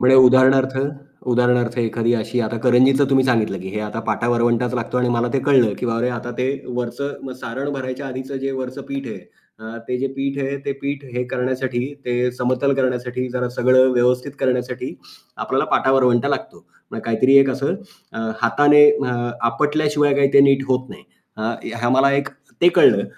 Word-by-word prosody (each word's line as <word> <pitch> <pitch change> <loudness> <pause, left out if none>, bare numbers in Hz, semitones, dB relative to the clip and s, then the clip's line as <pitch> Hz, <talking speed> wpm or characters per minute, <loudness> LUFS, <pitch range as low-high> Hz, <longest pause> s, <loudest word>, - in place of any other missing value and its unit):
म्हणजे 130 +1 +5
उदाहरणार्थ 130 +1 +5 0.5
उदाहरणार्थ 120 0 +1
एखादी 115 0 0
अशी 120 +2 -2
आता 115 +1 -2
करंजीचं 130 +3 +4
तुम्ही 135 -1 +3
सांगितलं 110 -6 0
की 95 - -7
हे 105 +1 -4
आता 105 +1 -5
पाटा-वरवंटाच 120 +1 0
लागतो 120 +1 -2
आणि 125 0 +1
मला 120 0 0
ते 135 - +1
कळलं 130 -6 +3
की - - -3
बाबा 115 -1 -1
रे 125 - +1
आता 120 0 -5
ते 125 - 0 0.2
वरचं 125 +3 -4
मग 130 - -6
सारण 130 +4 -5
भरायच्या 130 0 -5
आधीचं 130 +1 -6
जे 135 +1 -3
वरचं 130 +1 -6
पीठ 135 -1 -5
आहे, 110 - -7 0.4
अ, 110 +1 -9
ते 125 0 -2
जे 135 - -1
पीठ 140 +1 -3
आहे, 140 +1 -3
ते 140 - -2
पीठ 140 0 -4
हे 125 - -1
करण्यासाठी, 130 +1 -2
ते 125 0 0
समतल 130 +2 0
करण्यासाठी, 125 -1 -2
जरा 125 -1 -2
सगळं 130 +1 +4
व्यवस्थित 125 +2 +1
करण्यासाठी, 125 -1 -2 0.4
आपल्याला - - -1
पाटा-वरवंटा 130 -3 +2
लागतो. - - -5 0.3
म्हणजे - - -7
काहीतरी 115 +4 +2
एक 135 - +2
असं 135 +6 -2 0.7
हाताने 145 +5 +5
अ, 140 -4 -1 0.4
आपटल्याशिवाय 150 +2 +1
काही 140 -1 +3
ते 140 - +7
नीट 135 0 +3
होत 130 0 0
नाही. - - -12 0.3
अ, 110 +2 -2 0.2
ह्या 120 +1 0
मला 135 +1 +4
एक 140 +1 0 0.3
ते 175 - +7
कळलं. 100 -4 +5
125 Hz, 180 wpm, -20 LUFS, 120-135 Hz, 0.7 s, ते